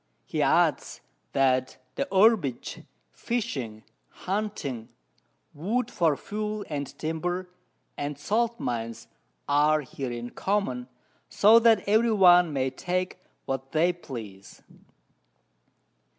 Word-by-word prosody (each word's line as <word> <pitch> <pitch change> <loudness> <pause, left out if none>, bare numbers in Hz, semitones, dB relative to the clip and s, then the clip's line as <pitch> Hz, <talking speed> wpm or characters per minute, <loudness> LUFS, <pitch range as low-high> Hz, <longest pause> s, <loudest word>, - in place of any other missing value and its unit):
He - - -2
adds, - - +2 0.3
that 130 -1 +2 0.2
the - - -2
Herbage, 190 - +2 0.3
Fishing, 135 - -4 0.4
Hunting, 175 - -3 0.6
Wood 215 +11 -2
for 160 -5 +2
Fuel 210 0 -4
and 145 -2 -3
Timber, 175 +3 -3 0.4
and 145 0 -4
Salt 230 +9 0
Mines, 115 -1 -4 0.4
are 150 +2 +3
here 130 -2 -6
in 120 0 -6
common, 190 -12 -1 0.4
so 220 +3 +6
that 225 -4 +4
every 220 +3 +4
one 180 -4 +6
may 135 -2 0
take 185 +3 -3 0.3
what 135 0 -4
they 170 +3 +3
please. 110 - -10
160 Hz, 105 wpm, -27 LUFS, 130-205 Hz, 0.6 s, so